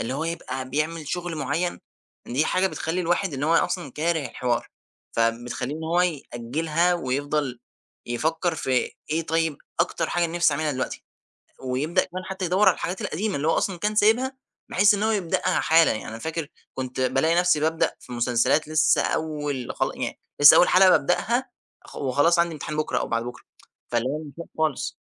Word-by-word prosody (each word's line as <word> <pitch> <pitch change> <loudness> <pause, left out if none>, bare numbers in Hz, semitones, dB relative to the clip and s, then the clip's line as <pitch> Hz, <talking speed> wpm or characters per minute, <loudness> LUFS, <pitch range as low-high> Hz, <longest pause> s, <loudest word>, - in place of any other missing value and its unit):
اللي 125 - -3
هو 160 - -2
يبقى 130 -6 -4
بيعمل 155 +2 -2
شُغل 175 -1 -3
معيّن، 155 +5 -1 0.5
دي 130 +6 +1
حاجة 185 +4 +2
بتخلّي 175 -1 -2
الواحد 175 -1 0
إن 135 - -4
هو 160 +3 +2
أصلًا 170 -3 0
كاره 160 -1 0
الحوار، 120 -2 -2 0.4
فبتخلّيه 120 +4 -1
إن 160 - -6
هو 170 +2 +2
يأجلها، 160 +2 0
ويفضَل 145 -3 -2 0.5
يفكّر 160 +8 -1
في 130 -5 0 0.2
إيه 160 +2 +1
طيّب 160 -2 0 0.2
أكتر 175 - 0
حاجة 175 -1 +1
نِفسي 170 -2 +2
أعملها 150 +1 -1
دلوقتي، 130 -1 -4 0.6
ويبدأ 150 +8 0
كمان 185 +1 -7
حتّى 190 0 -5
يدور 185 +4 +4
على - - +4
الحاجات 180 +1 -4
القديمة 200 +2 -2
اللي 150 +3 -1
هو - - +4
أصلًا 190 -3 -1
كان 210 +4 -1
سايبها، 240 +6 +3 0.3
بحيث 205 +2 +4
إن 205 - -2
هو 220 - +2
يبدأها 195 -6 0
حالًا، 165 +1 +5
يعني 110 - -6
أنا 110 +1 -7
فاكر 160 +1 -4 0.3
كنت 130 0 -4
بالاقي 135 +6 +2
نفسي 175 -3 +3
بابدأ 160 +1 +1
في 125 - -12
مسلسلات 125 +5 +1
لسّة 155 +1 +3
أول 145 -5 -2
خلا - - -1
يعني - - -4 0.2
لسّة 145 - +10
أول 180 - +6
حلقة 185 +1 +6
بابدأها 235 - +1 0.3
خ - - -13
وخلاص 145 +6 +2
عندي 170 -1 +2
امتحان 150 0 -5
بُكرة 150 -5 0
أو - - -3
بعد 115 0 0
بُكرة، 125 - -8 0.5
فاللي 120 +2 +1
هو 150 +3 -2
مش 145 - -10
وقته 170 - -8
خالص. 155 -4 0
160 Hz, 180 wpm, -24 LUFS, 135-175 Hz, 0.6 s, لسّة